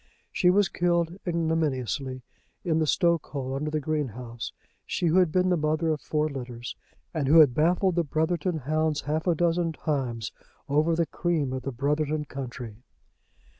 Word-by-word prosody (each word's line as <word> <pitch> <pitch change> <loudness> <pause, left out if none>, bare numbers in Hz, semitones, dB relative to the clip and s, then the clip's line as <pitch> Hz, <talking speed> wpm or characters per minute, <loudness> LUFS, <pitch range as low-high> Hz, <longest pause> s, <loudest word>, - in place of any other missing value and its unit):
She 180 - +3
was 200 +1 +4
killed 175 0 0
ignominiously 145 -6 -1 0.4
in 160 -3 +1
the 155 - +1
stokehole 150 -6 +1
under 145 +3 -2
the 155 0 -1
greenhouse, 125 -6 -3 0.3
she - - -2
who 170 +2 +3
had 180 -4 +3
been 185 +1 +2
the 180 - +3
mother 155 +1 0
of 155 -2 0
four 150 0 0
litters, 125 -4 -6 0.4
and 155 -5 -1
who 155 +4 +6
had 150 -6 +8
baffled 175 +6 +2
the 170 0 +2
Brotherton 160 +3 0
hounds 155 +2 0
half 155 +4 -2
a 175 - +3
dozen 170 0 +1
times 130 -8 -2 0.4
over 155 +4 +2
the 170 0 +2
cream 160 -6 -1
of 130 - -3
the 135 - -4
Brotherton 150 +4 0
country! 125 -5 -7
155 Hz, 165 wpm, -27 LUFS, 135-170 Hz, 0.4 s, had